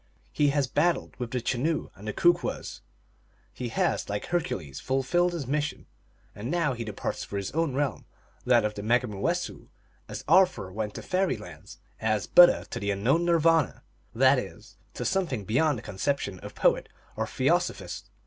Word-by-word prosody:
He 145 Hz, -, +2 dB
has 140 Hz, -1 st, +1 dB
battled 150 Hz, +7 st, 0 dB
with 120 Hz, -2 st, -3 dB
the 125 Hz, +1 st, -2 dB
Chenoo 140 Hz, +7 st, -1 dB
and 105 Hz, +2 st, -8 dB
Kookwess; 175 Hz, 0 st, +1 dB, 0.7 s
he 125 Hz, -2 st, -5 dB
has, 115 Hz, -, 0 dB
like 100 Hz, 0 st, -3 dB
Hercules, 160 Hz, -, -3 dB
fulfilled 135 Hz, +7 st, +1 dB
his 160 Hz, -5 st, -3 dB
mission; 145 Hz, +3 st, -2 dB, 0.5 s
and 110 Hz, +4 st, -6 dB
now 165 Hz, -4 st, +1 dB
he 120 Hz, -1 st, -5 dB
departs 105 Hz, -3 st, -4 dB
for 100 Hz, -, -5 dB
his 100 Hz, -1 st, -3 dB
own 160 Hz, -3 st, 0 dB
realm, 140 Hz, -4 st, -1 dB, 0.4 s
that 120 Hz, -3 st, +4 dB
of 105 Hz, -, -1 dB
the 105 Hz, -, -6 dB
Megumoowessoo, 110 Hz, -2 st, -1 dB, 0.4 s
as -, -, -6 dB
Arthur 95 Hz, -, +4 dB
went 105 Hz, 0 st, -4 dB
to -, -, -6 dB
Fairy 185 Hz, 0 st, 0 dB
Land, -, -, -11 dB, 0.2 s
as 110 Hz, -2 st, 0 dB
Buddha 175 Hz, 0 st, +7 dB
to -, -, -3 dB
the 100 Hz, -, -2 dB
unknown 125 Hz, +13 st, +2 dB
Nirvana, 165 Hz, -2 st, +3 dB, 0.3 s
that -, -, +5 dB
is, -, -, -9 dB, 0.2 s
to -, -, -4 dB
something 165 Hz, -, -1 dB
beyond 130 Hz, +6 st, +2 dB
the -, -, -9 dB
conception 100 Hz, -1 st, -2 dB
of -, -, -10 dB
poet -, -, +2 dB, 0.3 s
or -, -, -2 dB
theosophist. -, -, -1 dB
130 Hz, 165 wpm, -27 LUFS, 105-160 Hz, 0.7 s, Buddha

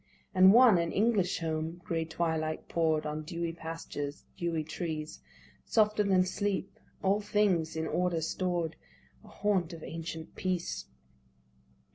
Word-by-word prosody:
And 190 Hz, 0 st, +8 dB
one, 230 Hz, -4 st, +7 dB
an 170 Hz, -1 st, 0 dB
English 210 Hz, -3 st, +2 dB
home 160 Hz, 0 st, -2 dB
â -, -, -26 dB
gray 165 Hz, -1 st, -1 dB
twilight 160 Hz, -1 st, -2 dB
pour'd 160 Hz, -2 st, +1 dB
On 150 Hz, 0 st, -3 dB
dewy 170 Hz, +2 st, -3 dB
pastures, 160 Hz, -3 st, -6 dB
dewy 170 Hz, -4 st, -1 dB
trees, 155 Hz, -1 st, -4 dB, 0.4 s
Softer 215 Hz, -1 st, +3 dB
than 190 Hz, -3 st, +3 dB
sleep 195 Hz, +1 st, -2 dB
â -, -, -29 dB, 0.3 s
all 200 Hz, +2 st, +3 dB
things 195 Hz, -7 st, +1 dB
in 160 Hz, 0 st, -1 dB
order 180 Hz, 0 st, 0 dB
stored, 170 Hz, -1 st, -1 dB, 0.5 s
A -, -, -16 dB
haunt 190 Hz, -5 st, 0 dB
of 165 Hz, -, -9 dB
ancient 160 Hz, -1 st, -6 dB
Peace. 185 Hz, -2 st, -2 dB
170 Hz, 140 wpm, -31 LUFS, 160-190 Hz, 0.5 s, And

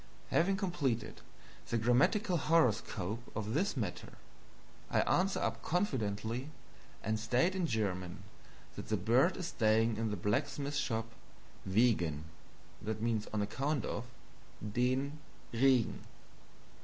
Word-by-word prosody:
Having 195 Hz, +4 st, +3 dB
completed 145 Hz, -, -1 dB, 0.5 s
the 120 Hz, -, +1 dB
grammatical 140 Hz, -, +3 dB
horoscope 115 Hz, -, +1 dB
of 110 Hz, 0 st, -2 dB
this 180 Hz, +3 st, +1 dB
matter, 100 Hz, -7 st, -4 dB, 0.8 s
I -, -, +3 dB
answer 190 Hz, +2 st, +2 dB
up -, -, -1 dB
confidently 125 Hz, -, -1 dB, 0.5 s
and 110 Hz, 0 st, 0 dB
state 125 Hz, -, +2 dB
in 185 Hz, -3 st, 0 dB
German 95 Hz, -, -2 dB, 0.5 s
that -, -, -7 dB
the 110 Hz, -, +1 dB
bird 125 Hz, -, +3 dB
is 175 Hz, -2 st, -3 dB
staying 110 Hz, 0 st, +2 dB
in 115 Hz, 0 st, 0 dB
the 105 Hz, -, -2 dB
blacksmith 140 Hz, -, -1 dB
shop 115 Hz, -4 st, -1 dB, 0.6 s
"wegen 95 Hz, -8 st, +2 dB, 1.1 s
(on 105 Hz, -, 0 dB
account 135 Hz, +7 st, -1 dB
of) 125 Hz, -, -3 dB, 0.7 s
DEN 130 Hz, +5 st, 0 dB, 0.3 s
Regen." 125 Hz, -1 st, +3 dB
120 Hz, 110 wpm, -34 LUFS, 110-150 Hz, 1.1 s, Having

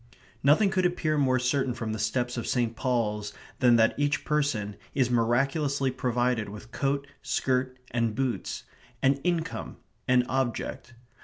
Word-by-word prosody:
Nothing 160 Hz, +9 st, +4 dB
could 185 Hz, -1 st, +1 dB
appear 160 Hz, -3 st, -1 dB
more 130 Hz, -3 st, +3 dB
certain 130 Hz, 0 st, 0 dB
from 115 Hz, -3 st, -3 dB
the 110 Hz, -, -4 dB
steps 120 Hz, +3 st, -1 dB
of 120 Hz, -, -4 dB
St. 120 Hz, -2 st, 0 dB
Paul's 105 Hz, -4 st, -1 dB, 0.3 s
than 125 Hz, -2 st, +6 dB
that 115 Hz, -1 st, +4 dB
each 145 Hz, 0 st, +1 dB
person 140 Hz, -10 st, 0 dB, 0.2 s
is 125 Hz, -3 st, +2 dB
miraculously 135 Hz, +4 st, +1 dB
provided 125 Hz, -3 st, 0 dB
with 105 Hz, +3 st, -10 dB
coat, 140 Hz, +2 st, -1 dB, 0.2 s
skirt, 130 Hz, 0 st, 0 dB
and 115 Hz, -2 st, 0 dB
boots; 130 Hz, -1 st, -2 dB, 0.4 s
an 135 Hz, +1 st, +4 dB
income; 170 Hz, -2 st, -2 dB, 0.3 s
an 125 Hz, -1 st, +4 dB
object. 120 Hz, -1 st, -2 dB
125 Hz, 145 wpm, -28 LUFS, 115-140 Hz, 0.4 s, than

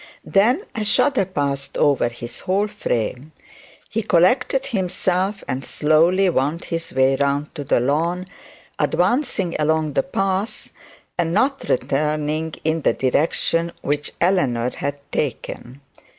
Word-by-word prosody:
Then 245 Hz, -, +3 dB
a 220 Hz, -, -2 dB
shudder 215 Hz, +1 st, +2 dB
passed 140 Hz, -6 st, -3 dB
over 140 Hz, -5 st, +3 dB
his 120 Hz, 0 st, -9 dB
whole 195 Hz, +3 st, 0 dB
frame; 145 Hz, -, -3 dB, 0.5 s
he 225 Hz, -, -2 dB
collected 245 Hz, +9 st, +3 dB
himself, 190 Hz, -3 st, -1 dB
and 130 Hz, +1 st, -3 dB
slowly 165 Hz, +8 st, +3 dB
wound 155 Hz, 0 st, 0 dB
his 165 Hz, -1 st, -4 dB
way 130 Hz, +1 st, +3 dB
round 140 Hz, +1 st, 0 dB
to 145 Hz, -, -5 dB
the 140 Hz, -, +2 dB
lawn, 165 Hz, +8 st, 0 dB, 0.5 s
advancing 195 Hz, -, +1 dB
along 155 Hz, -1 st, +1 dB
the 135 Hz, -, +3 dB
path 195 Hz, +5 st, -2 dB, 0.5 s
and 170 Hz, 0 st, +1 dB
not 270 Hz, +5 st, +1 dB
returning 150 Hz, +3 st, 0 dB
in 160 Hz, +1 st, 0 dB
the -, -, +3 dB
direction 165 Hz, +5 st, 0 dB
which 145 Hz, 0 st, -1 dB
Eleanor 130 Hz, -10 st, +2 dB
had 140 Hz, 0 st, -3 dB
taken. 135 Hz, -1 st, -4 dB
160 Hz, 125 wpm, -21 LUFS, 140-190 Hz, 0.5 s, Then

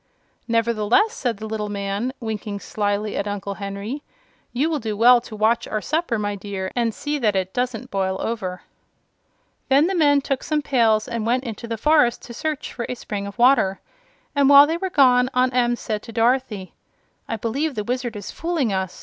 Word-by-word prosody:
"Nevertheless," 230 Hz, -, +2 dB
said 240 Hz, -, -2 dB
the 220 Hz, -, -7 dB
little 215 Hz, -1 st, -3 dB
man, 200 Hz, +4 st, -2 dB
winking 215 Hz, -3 st, -4 dB
slyly 205 Hz, 0 st, -2 dB
at 200 Hz, -, -2 dB
Uncle 200 Hz, -1 st, -4 dB
Henry, 200 Hz, +7 st, -5 dB, 0.5 s
"you 265 Hz, +6 st, +1 dB
will 320 Hz, -2 st, -1 dB
do 215 Hz, -3 st, -4 dB
well 240 Hz, +2 st, +6 dB
to 230 Hz, -2 st, -10 dB
watch 230 Hz, +3 st, +1 dB
our 215 Hz, -, -2 dB
supper, 310 Hz, -1 st, -1 dB
my 205 Hz, -1 st, -2 dB
dear, 195 Hz, -1 st, -5 dB
and 235 Hz, -2 st, +1 dB
see 295 Hz, +6 st, -3 dB
that 215 Hz, -5 st, +1 dB
it 190 Hz, 0 st, -1 dB
doesn't 250 Hz, 0 st, -3 dB
boil 190 Hz, -1 st, -1 dB
over." 190 Hz, -6 st, -4 dB, 1.1 s
Then 275 Hz, +3 st, +5 dB
the 380 Hz, -, 0 dB
men 290 Hz, -5 st, +4 dB
took 275 Hz, -1 st, -2 dB
some 305 Hz, -1 st, -1 dB
pails 225 Hz, -6 st, +2 dB
and 235 Hz, -2 st, -3 dB
went 245 Hz, +3 st, +1 dB
into 235 Hz, -1 st, -6 dB
the 230 Hz, 0 st, -3 dB
forest 295 Hz, -2 st, +3 dB
to 235 Hz, -, -9 dB
search 300 Hz, +4 st, -4 dB
for 235 Hz, -, -4 dB
a 250 Hz, -, -2 dB
spring 200 Hz, -4 st, -5 dB
of 200 Hz, -, -9 dB
water, 240 Hz, -6 st, +4 dB, 0.6 s
and 280 Hz, -1 st, +4 dB
while 285 Hz, 0 st, +9 dB
they 325 Hz, +3 st, -1 dB
were 380 Hz, +2 st, -3 dB
gone 255 Hz, -5 st, +4 dB
Aunt 255 Hz, 0 st, +2 dB
Em 240 Hz, -1 st, +2 dB
said 215 Hz, -3 st, -4 dB
to 230 Hz, -, -10 dB
Dorothy: 230 Hz, -4 st, 0 dB, 0.5 s
"I 225 Hz, -, -3 dB
believe 265 Hz, +7 st, -2 dB
the 210 Hz, -, -2 dB
Wizard 245 Hz, 0 st, -3 dB
is 205 Hz, -2 st, -6 dB
fooling 325 Hz, -, -1 dB
us. 190 Hz, -1 st, -3 dB
230 Hz, 195 wpm, -22 LUFS, 205-260 Hz, 1.1 s, while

